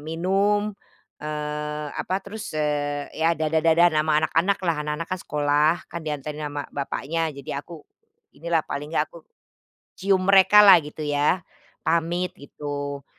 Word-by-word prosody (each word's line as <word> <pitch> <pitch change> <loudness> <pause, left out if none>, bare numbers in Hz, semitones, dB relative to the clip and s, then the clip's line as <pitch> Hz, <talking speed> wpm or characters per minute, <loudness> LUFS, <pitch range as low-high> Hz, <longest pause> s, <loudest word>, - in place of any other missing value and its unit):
minum, 195 +7 0 0.5
eee, 150 0 -4
apa 185 - -2
terus, 210 -5 -7
eee, 145 -1 -2
ya 165 0 +1
dadah-dadahan 160 +2 +3
ama 155 0 +2
anak-anak 190 +6 +1
lah, 165 -3 +1
anak-anak 150 +2 -3
kan 185 - -3
sekolah, 150 +1 +2 0.2
kan 170 - -4
dianterin 150 -1 -5
sama 145 0 -5
bapaknya 160 +3 -2
jadi 140 0 -5
aku 160 -1 -12 0.5
inilah, 165 -1 -1
paling 145 +1 -5
enggak 150 - 0
aku, 170 -2 -14 0.6
cium 190 -1 +1
mereka 195 +2 +7
lah 195 -4 +9
gitu 150 0 -7
ya, 150 +4 +1 0.4
pamit 170 +3 0
gitu. 145 -1 -6
155 Hz, 135 wpm, -24 LUFS, 150-175 Hz, 0.6 s, lah